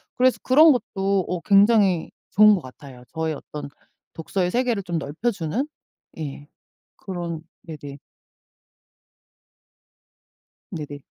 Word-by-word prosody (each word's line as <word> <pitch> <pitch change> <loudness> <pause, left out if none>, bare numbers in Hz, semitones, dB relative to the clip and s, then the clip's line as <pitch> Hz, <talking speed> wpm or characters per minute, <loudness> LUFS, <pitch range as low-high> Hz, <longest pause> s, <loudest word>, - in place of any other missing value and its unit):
그래서 255 0 +3
그런 305 +5 +7
것도 195 -6 0
어 180 - -2
굉장히 200 -3 +4 0.2
좋은 210 +2 +7
것 180 - -4
같아요. 130 0 -12
저의 160 -1 -1
어떤 145 0 -8 0.4
독서의 180 +2 -2
세계를 240 -4 0
좀 170 -3 -2
넓혀주는? 190 - -2 0.5
예. 145 -1 -6 0.5
그런 175 -4 -5 0.2
네네. 145 -4 -9 2.7
네네. 145 -3 -6
180 Hz, 210 characters per minute, -23 LUFS, 155-210 Hz, 2.7 s, 그런